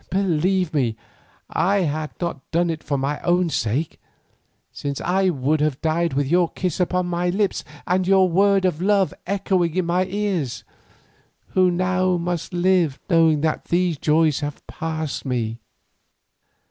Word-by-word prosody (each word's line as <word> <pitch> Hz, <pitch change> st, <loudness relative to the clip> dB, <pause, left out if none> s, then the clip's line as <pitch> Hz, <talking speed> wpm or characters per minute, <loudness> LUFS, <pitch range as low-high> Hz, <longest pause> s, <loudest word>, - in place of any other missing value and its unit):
Believe 185 Hz, -1 st, +1 dB
me, 125 Hz, -7 st, +1 dB, 0.5 s
I 195 Hz, +4 st, +1 dB
had 155 Hz, -2 st, -2 dB
not 170 Hz, -6 st, -4 dB
done 170 Hz, +1 st, +1 dB
it 160 Hz, -1 st, -5 dB
for 145 Hz, -1 st, -1 dB
my 140 Hz, +2 st, -2 dB
own 175 Hz, -1 st, +1 dB
sake, 135 Hz, +5 st, -1 dB, 0.7 s
since 140 Hz, -1 st, -4 dB
I 190 Hz, +2 st, +1 dB
would 150 Hz, -1 st, 0 dB
have 150 Hz, -3 st, 0 dB
died 165 Hz, 0 st, 0 dB
with 140 Hz, +1 st, +1 dB
your 170 Hz, +4 st, +2 dB
kiss 185 Hz, -1 st, -3 dB
upon 180 Hz, 0 st, +1 dB
my 175 Hz, 0 st, -1 dB
lips 200 Hz, +2 st, 0 dB, 0.2 s
and 180 Hz, 0 st, +1 dB
your 190 Hz, -1 st, +5 dB
word 195 Hz, +2 st, +3 dB
of 175 Hz, -3 st, 0 dB
love 195 Hz, -1 st, +2 dB
echoing 185 Hz, -4 st, 0 dB
in 185 Hz, -2 st, +1 dB
my 180 Hz, +2 st, +1 dB
ears, 190 Hz, -, -2 dB, 0.9 s
who 185 Hz, -1 st, +3 dB
now 185 Hz, +1 st, +1 dB
must 175 Hz, 0 st, -3 dB
live 175 Hz, -5 st, +2 dB
knowing 165 Hz, -3 st, +4 dB
that 155 Hz, 0 st, -1 dB
these 175 Hz, -1 st, +1 dB
joys 155 Hz, -1 st, +2 dB
have 145 Hz, -1 st, -6 dB
passed 160 Hz, -3 st, -4 dB
from 135 Hz, -, -6 dB
me." 115 Hz, -2 st, -2 dB
170 Hz, 155 wpm, -22 LUFS, 155-185 Hz, 0.9 s, your